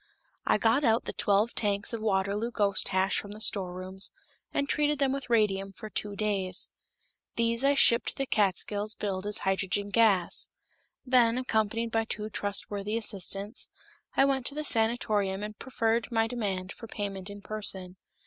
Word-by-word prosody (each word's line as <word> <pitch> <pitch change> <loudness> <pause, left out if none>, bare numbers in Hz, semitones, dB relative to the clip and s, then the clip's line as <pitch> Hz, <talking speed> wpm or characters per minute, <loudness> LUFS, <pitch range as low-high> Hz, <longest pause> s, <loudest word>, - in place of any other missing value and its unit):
I - - +4
got 230 +6 +2
out 230 -2 +3
the - - -4
twelve 205 +3 +2
tanks 205 +1 +1
of 230 - -3
Waterloo 205 +2 0
ghost 205 -4 +1
hash 190 0 +1
from 205 0 -7
the 210 - -10
storerooms, 190 -2 0 0.4
and 280 - -1
treated 295 +1 +1
them 270 -1 +1
with 275 -3 -5
radium 195 -4 +2
for 215 +3 -10
two 205 -1 -1
days. 195 -3 0 0.6
These 230 +1 +2
I 280 +1 +4
shipped 235 -3 +5
to - - -1
the 275 - -2
Catskills 205 -1 0
billed 195 -1 -3
as 210 - +2
hydrogen 195 +1 0
gas. 200 -6 +2 0.6
Then, 245 -2 +4
accompanied 230 -2 0
by 225 0 +1
two 215 -1 -3
trustworthy 205 +1 -2
assistants, 200 0 -1 0.5
I 270 - +6
went 270 -2 +1
to 285 - -1
the 305 - -3
sanatorium 215 -6 +1
and 210 0 -7
preferred 230 -2 -1
my 225 -1 +2
demand 200 -6 -3
for 230 - -10
payment 200 -2 -5
in 205 0 -10
person. 190 -4 -1
210 Hz, 165 wpm, -29 LUFS, 195-230 Hz, 0.6 s, I